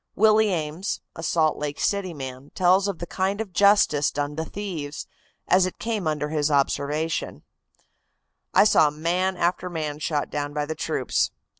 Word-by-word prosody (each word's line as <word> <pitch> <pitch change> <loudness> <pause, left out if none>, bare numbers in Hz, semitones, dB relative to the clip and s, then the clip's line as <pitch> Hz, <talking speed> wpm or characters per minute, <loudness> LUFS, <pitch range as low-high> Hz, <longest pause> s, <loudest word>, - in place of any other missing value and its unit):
Willis 220 +1 +5
Ames, 170 +1 -2
a - - -7
Salt 160 -1 +1
Lake 145 -1 -4
City 200 -3 0
man, 130 0 -7
tells 185 +2 +4
of 200 -3 -3
the 175 - -5
kind 190 +3 -1
of 215 -5 -5
justice 200 -8 +4
done 145 0 -3
to 160 - -2
thieves, 160 -6 -5 0.4
as 185 0 +4
it 185 - -7
came 220 -7 -2
under 150 -1 -1
his 150 -1 0
observation: 145 +2 -1 1.1
"I - - +6
saw 155 -7 +5
man 175 +5 -1
after 180 +1 0
man 155 -3 -4
shot 150 -2 -2
down 145 0 -3
by 150 -1 0
the 160 - -3
troops. 155 - 0
160 Hz, 165 wpm, -24 LUFS, 150-190 Hz, 1.1 s, I